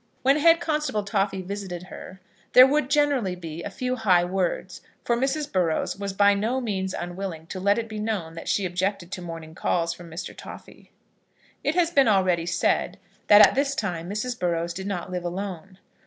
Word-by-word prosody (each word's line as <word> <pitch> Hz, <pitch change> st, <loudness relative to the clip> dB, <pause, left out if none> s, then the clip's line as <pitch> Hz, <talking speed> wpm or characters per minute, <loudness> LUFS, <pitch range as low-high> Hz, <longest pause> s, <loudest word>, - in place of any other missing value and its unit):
When 275 Hz, +3 st, +4 dB
Head 330 Hz, +2 st, +5 dB
Constable 300 Hz, -10 st, -1 dB
Toffy 195 Hz, -1 st, -1 dB
visited 190 Hz, -2 st, -6 dB
her 190 Hz, 0 st, -11 dB, 0.3 s
there 255 Hz, -, +10 dB
would 290 Hz, +1 st, +2 dB
be 290 Hz, +4 st, 0 dB
generally 185 Hz, -, 0 dB
a 205 Hz, -, -5 dB
few 255 Hz, +5 st, -3 dB
high 185 Hz, -6 st, +3 dB
words, 185 Hz, 0 st, -2 dB, 0.2 s
for 235 Hz, -, +2 dB
Mrs. 275 Hz, +4 st, -1 dB
Burrows 175 Hz, -5 st, 0 dB
was 200 Hz, 0 st, -4 dB
by 200 Hz, +1 st, +4 dB
no 220 Hz, +6 st, 0 dB
means 190 Hz, -6 st, -3 dB
unwilling 175 Hz, -2 st, -5 dB
to 185 Hz, -, -5 dB
let 200 Hz, +2 st, +2 dB
it 230 Hz, -1 st, -2 dB
be 215 Hz, -1 st, -6 dB
known 210 Hz, -7 st, -3 dB
that 165 Hz, -, -9 dB
she 200 Hz, -, +1 dB
objected 185 Hz, 0 st, -2 dB
to 185 Hz, -, -5 dB
morning 165 Hz, -2 st, -8 dB
calls 170 Hz, 0 st, 0 dB
from 175 Hz, -1 st, -12 dB
Mr. 165 Hz, +4 st, -7 dB
Toffy. -, -, -12 dB, 0.7 s
It 300 Hz, -, 0 dB
has 345 Hz, -2 st, +2 dB
been 275 Hz, -6 st, +4 dB
already 185 Hz, -5 st, +2 dB
said -, -, 0 dB, 0.3 s
that 210 Hz, 0 st, +9 dB
at -, -, -3 dB
this 275 Hz, 0 st, 0 dB
time 175 Hz, -7 st, -3 dB
Mrs. 240 Hz, +4 st, -3 dB
Burrows 170 Hz, -1 st, -1 dB
did 190 Hz, +2 st, -6 dB
not 185 Hz, -2 st, -4 dB
live 180 Hz, -1 st, -3 dB
alone. 185 Hz, 0 st, -5 dB
195 Hz, 190 wpm, -25 LUFS, 175-235 Hz, 0.7 s, there